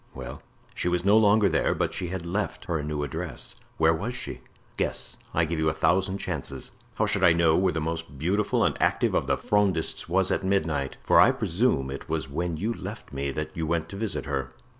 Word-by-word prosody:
"Well?" 65 -1 -7 0.3
"She - - -1
was 90 0 0
no 100 +2 +6
longer 105 -1 +5
there, - - +1
but - - -1
she 90 - -3
had 90 -1 -5
left 100 +4 -3
her 85 -4 -1
new 75 0 -3
address." 70 - -5 0.2
"Where 80 0 +4
was 105 +10 -3
she?" 130 - -5 0.3
"Guess; - - -2
I 85 - +2
give 80 0 -2
you 80 0 +2
a 80 - -2
thousand 95 +3 +2
chances." 90 -7 -5 0.2
"How - - +2
should 100 -1 +1
I 85 -2 +7
know 85 -1 +4
where 95 +1 +3
the 80 - -2
most 80 -2 -4
beautiful 95 +8 +1
and - - +2
active - - +2
of - - +1
the - - +2
Frondists 95 -6 0
was 95 +2 +2
at - - 0
midnight? 80 -8 0
for - - +5
I - - +8
presume 85 - +1
it 70 +3 -7
was 80 -3 -1
when 85 +3 -2
you 110 +8 -1
left 70 - -8
me 70 0 -2
that 75 +3 -3
you 80 -1 -2
went 80 0 -1
to - - -7
visit 105 +1 -2
her." 65 -3 -3
85 Hz, 220 wpm, -27 LUFS, 75-95 Hz, 0.3 s, I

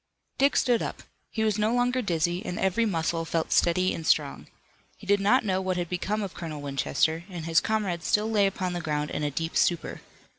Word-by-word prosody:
Dick 275 +1 +4
stood 240 -2 +3
up. - - -5 0.3
He 220 - -2
was 215 -1 +1
no 215 +1 +2
longer 245 +1 +1
dizzy, 175 -3 0
and 180 - -4
every 210 +5 +1
muscle 165 -3 -1
felt 165 0 -2
steady 185 +2 +3
and 165 - -5
strong. - - +1 0.5
He - - -14
did 200 +1 +3
not 220 +5 +3
know 190 -2 0
what 185 -1 -1
had 175 -2 -2
become 205 +4 -2
of 195 - -5
Colonel 160 -3 -6
Winchester, 145 +3 0
and 175 -4 -6
his 165 -1 +3
comrades 195 -6 -1
still 210 +1 +2
lay 210 -3 +3
upon 185 -2 -3
the 175 - -3
ground 150 -1 -2
in - - -3
a 150 - 0
deep 165 +4 -4
stupor. 170 -2 0
180 Hz, 215 wpm, -27 LUFS, 165-210 Hz, 0.5 s, Dick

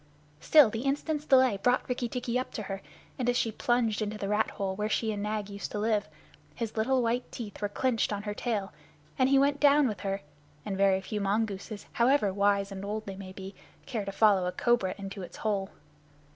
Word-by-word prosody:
Still, 295 -8 +6
the 225 - -3
instant's 290 +3 -1
delay 260 -7 +5
brought 245 +6 +1
Rikki 250 -1 -2
tikki 250 0 -1
up 255 - -4
to 215 - -4
her, 195 0 -5 0.4
and 245 -1 +1
as 245 - +2
she 225 - +1
plunged 230 -1 +1
into 215 0 -2
the 200 - -3
rat 210 +2 +1
hole 190 -1 -3
where 210 +2 -2
she 220 0 0
and 205 -1 -3
Nag 210 -1 -2
used 200 -1 -6
to - - -2
live, 210 -1 0 0.5
his 230 -2 -4
little 250 +3 +2
white 235 +2 -1
teeth 215 -4 -7
were 205 - 0
clenched 230 +2 0
on 205 0 -3
her 210 -1 -3
tail, 205 -3 -2 0.5
and 260 0 +4
he 275 - +5
went 280 +1 +3
down 290 -1 +5
with 210 -5 -3
her 195 +1 -2 0.4
and 200 - -2
very 195 -1 +3
few 210 +2 -4
mongooses, 205 0 -2
however 235 -5 +3
wise 200 0 +2
and 195 0 -6
old 215 +2 -4
they 195 - -6
may 190 -1 -8
be, 190 +1 -8 0.3
care 225 -5 -3
to 195 - -3
follow 195 -3 +4
a - - -1
cobra 235 -4 +1
into 195 0 -7
its 180 - -9
hole. 200 -3 -1
215 Hz, 215 wpm, -29 LUFS, 200-245 Hz, 0.5 s, Still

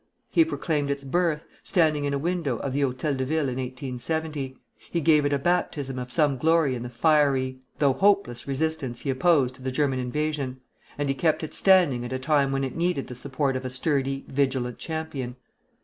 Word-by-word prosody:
He 330 - +6
proclaimed 155 - -1
its 140 0 -2
birth, 160 +2 0 0.2
standing 155 -6 +2
in 140 - -1
a - - +1
window 165 -4 -1
of 135 +2 -4
the 140 - 0
Hôtel 135 +1 0
de 130 - 0
Ville 150 +1 0
in 125 - -4
1870; 135 +2 -4 0.3
he 170 - 0
gave 150 -2 +4
it - - -2
a 140 - +3
baptism 145 -4 -1
of 125 0 -6
some 145 -3 +2
glory 160 -2 +3
in 120 - -4
the 120 - -5
fiery, 135 -1 +2 0.2
though 140 -3 +3
hopeless, 195 -9 +2
resistance 140 -3 -2
he 140 - -1
opposed 135 -2 +3
to 130 - -15
the 130 - -2
German 135 -1 0
invasion; 140 0 -2 0.4
and 145 0 -1
he 135 - +2
kept 155 +4 +1
it 155 - -5
standing 175 -11 +4
at 120 - -6
a 130 - -1
time 140 +1 +2
when 135 0 0
it 130 -2 -3
needed 170 -4 0
the - - -5
support 135 +2 -1
of 130 - -3
a 130 - -3
sturdy, 135 0 -1
vigilant 130 -3 -1
champion. 155 -6 -4
140 Hz, 200 wpm, -26 LUFS, 130-155 Hz, 0.4 s, He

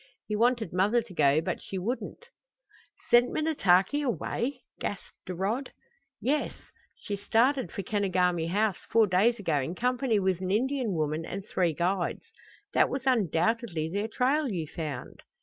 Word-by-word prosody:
He 210 - -2
wanted 235 -4 +1
mother 210 +6 +2
to 215 -5 -13
go, 145 -1 +4
but - - -3
she 195 - -6
wouldn't." 250 - -4 0.8
"Sent 240 +1 +6
Minnetaki 285 - +2
away?" 265 0 -2 0.2
gasped - - -6
Rod. 200 +9 -2 0.5
"Yes. 295 +4 0 0.4
She 205 - -4
started 240 +7 +1
for 200 - -4
Kenogami 180 -4 +1
House 205 +2 +1
four 225 -1 +5
days 205 +5 +3
ago 165 -8 0
in 160 +7 -4
company 250 0 +1
with 190 -2 0
an 185 - -2
Indian 250 +1 0
woman 155 0 -1
and 190 +4 -6
three 180 -5 0
guides. 175 +2 -1 0.5
That - - +4
was 265 0 -4
undoubtedly 195 - +1
their 205 +3 -1
trail 265 +5 +1
you 175 -7 -2
found." 155 -2 -6
205 Hz, 150 wpm, -28 LUFS, 180-245 Hz, 0.8 s, Sent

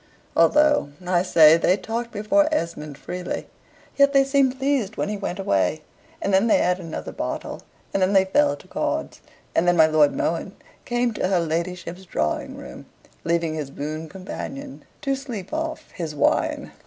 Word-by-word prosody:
although, 300 - +4 0.2
I 180 -1 +2
say, 160 -3 +6
they 180 +3 +3
talked 230 +4 -4
before 260 +9 +2
Esmond 155 - -3
freely, 180 +4 -5 0.5
yet 280 0 +4
they 275 -1 +6
seemed 270 -1 +2
pleased 265 -6 0
when - - -1
he 210 - -2
went 195 -3 -4
away, 150 - 0 0.4
and 200 - 0
then 195 +4 +4
they - - +5
had 180 +1 +1
another 165 -3 -6
bottle, - - -5 0.3
and 195 - +1
then 185 +1 +3
they 190 -1 +5
fell 290 +10 +2
to - - -17
cards, - - -3 0.3
and 175 - +2
then 175 0 +4
my 160 - +8
Lord 155 -2 +4
Mohun 170 +4 -1 0.3
came 240 -1 0
to 210 - -1
her 185 -2 +2
ladyship's 170 +2 -3
drawing 75 - -2
room; - - -10 0.4
leaving 165 -1 0
his 150 -3 -4
boon 155 +3 -5
companion 270 - -7 0.2
to 275 - 0
sleep 245 -8 -7
off 315 0 -4
his 160 -4 -5
wine. 140 - +1
185 Hz, 170 wpm, -23 LUFS, 165-250 Hz, 0.5 s, my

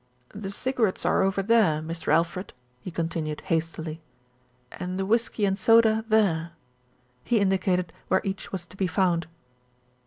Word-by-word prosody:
"The 200 -1 -6
cigarettes 225 -1 0
are - - +3
over 195 0 +1
there, 205 -8 +3
Mr. 160 0 -4
Alfred," 170 +4 0 0.3
he 155 - -7
con 165 -1 -2
tinued 155 -2 -4
hastily, 160 -1 -3 0.7
"and 180 +1 -5
the 190 - -1
whisky 225 0 +1
and 195 -1 +1
soda 220 +1 +4
there." 170 -6 +2 0.7
He 235 - +2
indicated 185 -3 +1
where 190 - +2
each 195 0 -4
was 185 -3 -5
to 185 - -16
be 190 - +1
found. 175 -2 +1
190 Hz, 150 wpm, -26 LUFS, 165-205 Hz, 0.7 s, soda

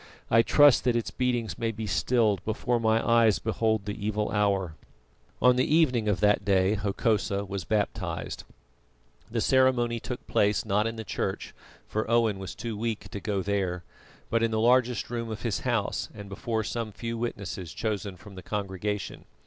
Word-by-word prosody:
I 115 - +7
trust 145 +2 +5
that 125 -2 +3
its 115 - -1
beatings 120 -7 -1
may 115 - 0
be 110 0 -5
stilled 105 -1 +1
before 115 +3 0
my 110 0 +2
eyes 115 -3 +5
behold 110 -2 0
the 105 0 -5
evil 105 0 -1
hour." 100 -5 +1 0.7
On 125 0 +6
the 135 +4 +2
evening 125 -9 +3
of 105 -2 0
that 105 -1 +3
day 95 0 +3
Hokosa 100 0 0
was 95 -2 -5
baptised. 105 -2 -2 0.9
The 115 0 -1
ceremony 125 -3 +3
took 125 +2 -6
place, 100 -2 +1
not 105 +1 +1
in 115 - -4
the 110 - -5
church, 100 - -3 0.3
for 110 +1 -2
Owen 115 -4 +2
was 95 -2 -6
too 115 -2 -5
weak 110 +1 -3
to 100 - -6
go 100 -1 -2
there, 95 -3 -1 0.5
but 115 - +2
in 115 - +2
the 110 -1 -1
largest 120 0 +2
room 115 -1 -3
of 110 -1 -6
his 115 -5 -1
house 120 -5 -1
and 100 -2 -9
before 110 +2 -2
some 115 0 -3
few 115 +3 -5
witnesses 100 -7 -4
chosen 100 -2 -3
from 105 +2 -13
the 95 - -9
congregation. 100 0 -4
110 Hz, 175 wpm, -27 LUFS, 100-115 Hz, 0.9 s, I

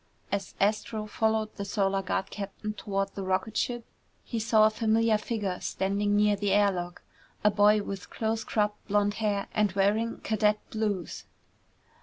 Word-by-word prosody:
As 200 -2 -3
Astro 215 +1 0
followed 220 0 0
the 200 - -3
Solar 195 -1 0
Guard 190 +1 -2
captain 205 +1 -5
toward 195 -1 -2
the 200 - -5
rocket 190 +3 -1
ship 240 -1 -1 0.4
he 230 - -3
saw 220 -1 +4
a 215 - +4
familiar 220 0 +2
figure 210 -5 -3
standing 200 +2 0
near 210 0 +4
the 200 -1 0
air 205 0 +5
lock. 175 -1 -5 0.4
A 210 - +5
boy 205 +1 +4
with 195 -2 -6
close 225 0 -2
cropped 210 -1 -1
blond 205 0 +2
hair 205 -2 0
and 210 -2 +2
wearing 210 +4 +1
cadet 210 -1 +2
blues. 210 -6 -2
210 Hz, 160 wpm, -28 LUFS, 195-215 Hz, 0.4 s, air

